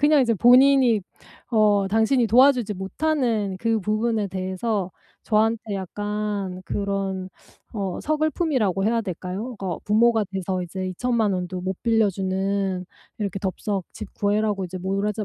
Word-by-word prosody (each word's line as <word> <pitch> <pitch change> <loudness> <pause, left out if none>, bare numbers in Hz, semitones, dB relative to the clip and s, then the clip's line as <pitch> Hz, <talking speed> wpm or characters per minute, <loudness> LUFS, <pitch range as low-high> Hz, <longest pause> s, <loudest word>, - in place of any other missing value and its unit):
그냥 295 -1 +5
이제 230 -3 +2
본인이 250 0 +5 0.5
어 210 -4 +3
당신이 225 +4 +2
도와주지 245 -2 +4
못하는 220 -1 -1
그 225 0 0
부분에 215 +1 0
대해서 190 +1 -2 0.3
저한테 220 -1 +1
약간 205 0 -3
그런 195 -2 -2 0.4
어 195 -4 -3
서글픔이라고 300 - 0
해야 230 +1 +2
될까요? 195 +4 -5
어 185 -4 -3
부모가 220 +1 +3
돼서 185 -1 -2
이제 185 +2 -4
2,000,000 220 +2 0
원도 180 0 -3
못 190 +1 -2
빌려 225 -3 +3
주는 190 0 -1 0.3
이렇게 200 -3 -3
덥석 195 0 -3
집 215 -3 -8
구해라고 205 -1 0
이제 185 +1 -7
모라자 200 +3 -2
205 Hz, 290 characters per minute, -23 LUFS, 190-230 Hz, 0.5 s, 그냥